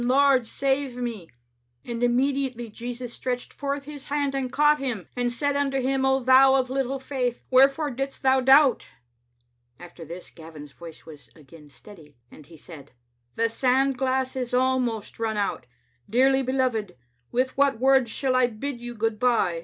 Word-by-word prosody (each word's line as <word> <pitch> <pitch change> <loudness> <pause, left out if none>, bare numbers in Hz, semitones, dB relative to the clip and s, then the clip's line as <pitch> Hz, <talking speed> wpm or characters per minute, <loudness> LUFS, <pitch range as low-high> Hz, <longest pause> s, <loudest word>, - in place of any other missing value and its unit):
Lord, 260 -1 +3
save 270 -1 -1
me. 230 -8 -5 0.6
"*And 235 -1 -5
immediately 250 -1 0
Jesus 240 +1 -7
stretched 250 -1 -4
forth 280 0 -4
His 290 -1 -10
hand 285 -1 -1
and 265 -2 -3
caught 300 +1 +3
him, 245 -9 -4
and 245 -1 -1
said 285 +3 -1
unto 275 -1 0
him, 265 +1 0
O 265 0 +2
thou 265 +1 +6
of 260 -1 0
little 270 0 -1
faith, 260 -2 -3
wherefore 275 +3 +4
didst 270 +3 -5
thou 265 0 +4
doubt?* 270 +1 +5 0.5
" 120 0 -45
After 175 -1 -12
this 170 +3 -10
Gavin's 155 -3 -12
voice 165 +1 -13
was 150 -3 -14
again 150 0 -16
steady, 155 - -16
and 150 - -15
he 165 - -15
said, 145 -4 -13 0.4
"The 230 - +1
sand 265 +3 +1
glass 260 0 -1
is 250 -1 -3
almost 250 -5 -1
run 220 -1 -2
out. 200 -10 -2 0.4
Dearly 265 +4 +3
be 260 0 -3
loved, 230 -8 -1 0.4
with 255 +1 0
what 280 -2 +2
words 265 -1 +3
shall 260 +2 -1
I 255 -1 +4
bid 240 +2 -6
you 240 0 -7
good 225 -1 -2
by?" 230 -9 +1
250 Hz, 170 wpm, -25 LUFS, 220-270 Hz, 0.6 s, thou